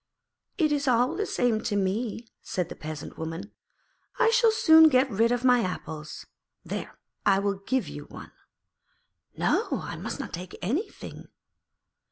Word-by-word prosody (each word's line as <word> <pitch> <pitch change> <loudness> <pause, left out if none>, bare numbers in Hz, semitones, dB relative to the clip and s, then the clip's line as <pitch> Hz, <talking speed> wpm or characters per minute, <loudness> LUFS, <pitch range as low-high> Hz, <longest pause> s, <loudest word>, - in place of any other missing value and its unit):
'It 315 -5 +2
is 285 -1 0
all 250 +5 +3
the 415 +3 -2
same 235 -3 +1
to 220 -2 -2
me,' 210 +4 -1
said 180 -2 -3
the - - -7
Peasant 155 -1 -8
Woman. 165 +6 -5 0.7
'I 475 -2 +4
shall 465 0 +5
soon 320 -7 +7
get 260 -1 +4
rid 225 +3 +2
of 245 0 0
my 250 -1 +6
apples. 160 -6 -5 0.4
There, - - -5 0.3
I 195 - +4
will 200 0 -1
give 260 -5 0
you 145 0 -8
one.' - - -11 1.1
'No; - - +1 0.2
I - - -6
must - - -5
not - - -6
take 180 +1 -7
anything.' 275 - -4
230 Hz, 155 wpm, -27 LUFS, 185-285 Hz, 1.1 s, soon